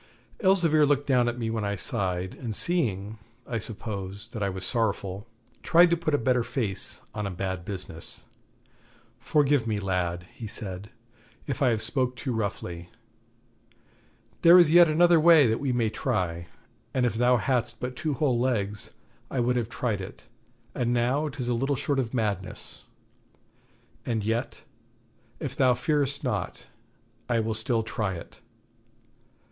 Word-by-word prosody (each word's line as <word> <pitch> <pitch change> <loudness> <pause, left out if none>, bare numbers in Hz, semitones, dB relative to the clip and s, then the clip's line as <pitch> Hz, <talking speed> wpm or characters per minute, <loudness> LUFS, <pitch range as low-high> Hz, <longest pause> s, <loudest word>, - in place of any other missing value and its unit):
Elzevir 175 -7 +4
looked 145 -1 +2
down 125 -3 +3
at 120 - -5
me 115 -2 -2
when 110 -1 -2
I 100 0 -1
sighed, 95 -4 -1
and 115 -4 -5
seeing, 110 - 0 0.3
I 115 - -3
suppose, 100 -1 -5
that 110 - -7
I 100 - +1
was 95 -1 -4
sorrowful, 105 -3 -1 0.3
tried 175 +1 +5
to - - +5
put 160 -3 0
a - - +3
better 125 0 +1
face 110 -7 -3
on 105 -1 -3
a - - -3
bad 95 -1 -4
business. 90 -4 -3 1.0
'Forgive 145 -5 +2
me, 105 -2 0
lad,' 90 -3 -2
he 115 - -7
said, 100 -1 -5 0.6
'if 140 +1 -4
I 135 - +4
have 110 -2 +1
spoke 125 +2 0
too 125 0 -3
roughly. 90 -5 -4 1.5
There 170 +1 +8
is 170 -4 +6
yet 175 0 +8
another 170 +2 +5
way 160 -2 +7
that 110 -1 +1
we 135 -2 -1
may 115 -3 +1
try; 85 -5 -2 0.5
and 130 -1 +2
if 120 - +1
thou 125 +2 +3
hadst 120 +1 -1
but 125 0 -4
two 155 0 -2
whole 135 -6 +1
legs, 105 -5 -1 0.3
I 130 - -2
would 125 +1 +1
have 120 -2 -1
tried 115 -4 -2
it, 95 - -9 0.5
but 125 - -1
now 125 +5 +1
'tis 130 -3 -5
little 130 +4 0
short 140 +1 -1
of 120 -4 -2
madness. 110 -5 -4 1.2
And 115 -3 -2
yet, 115 +3 -2 0.8
if - - -4
thou 130 -2 +4
fear'st 140 +1 0
not, - - -3 0.6
I 120 -1 +2
will 110 0 -1
still 115 +1 -1
try 110 -3 -2
it. 85 - -11
120 Hz, 155 wpm, -27 LUFS, 100-135 Hz, 1.5 s, There